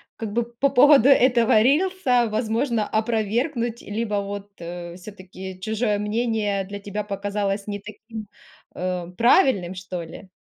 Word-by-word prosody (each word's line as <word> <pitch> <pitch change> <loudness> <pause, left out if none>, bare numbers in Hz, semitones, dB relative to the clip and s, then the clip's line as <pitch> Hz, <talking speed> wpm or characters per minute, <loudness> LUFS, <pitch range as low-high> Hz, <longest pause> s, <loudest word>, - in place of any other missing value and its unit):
как 220 -2 -5
бы 235 +1 +1
по 235 +4 -1
поводу 275 -1 +6
этого 240 -5 +5
рилса, 275 - +2
возможно, 225 0 0
опровергнуть, 230 +2 -1
либо 210 0 -3
вот, 200 0 -7
э, 175 0 -7
всё-таки 185 -1 -10
чужое 215 0 0
мнение 210 -2 -1
для 200 +1 -7
тебя 205 +1 -4
показалось 200 0 -3
не 205 0 -4
таким, 215 +1 -9 0.5
э, 180 -1 -3
правильным, 235 - +3
что 185 -1 -6
ли? 170 +4 -11
215 Hz, 130 wpm, -23 LUFS, 195-235 Hz, 0.5 s, поводу